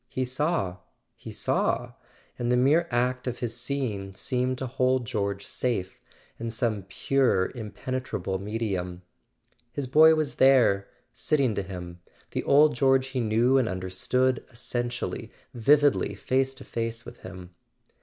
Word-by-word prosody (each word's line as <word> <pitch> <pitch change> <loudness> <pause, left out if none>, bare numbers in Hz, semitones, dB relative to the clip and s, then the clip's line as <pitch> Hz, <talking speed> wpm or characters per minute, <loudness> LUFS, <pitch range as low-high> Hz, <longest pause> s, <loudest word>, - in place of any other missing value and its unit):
He 130 +2 -2
saw—he 130 - -3
saw; - - 0 0.5
and 120 0 0
the 125 - +4
mere 150 +7 +4
act 125 +1 0
of 125 - -2
his 115 -2 -3
seeing 120 -7 -3
seemed 125 +5 -1
to 130 - -4
hold 130 0 +1
George 100 -2 -2
safe 105 -7 -2 0.4
in 115 - -3
some 110 -4 -2
pure 125 -5 +1
impenetrable 110 -4 -4
medium. 95 -4 -3 0.7
His 140 +2 -3
boy 155 +5 +7
was 155 -2 -2
there, 125 -7 +5 0.3
sitting 140 -7 +1
to 100 - -1
him, 90 -2 -8 0.3
the - - -2
old 150 +2 +5
George 135 +1 +3
he 135 -1 -2
knew 120 +4 +3
and 125 - +1
un¬ 95 -2 -3
derstood, 125 +8 0
essentially, 120 0 -3 0.2
vividly 145 +4 +3
face 135 +1 0
to - - -11
face 115 0 -4
with 120 - -11
him. 90 -1 -10
120 Hz, 140 wpm, -27 LUFS, 100-130 Hz, 0.7 s, boy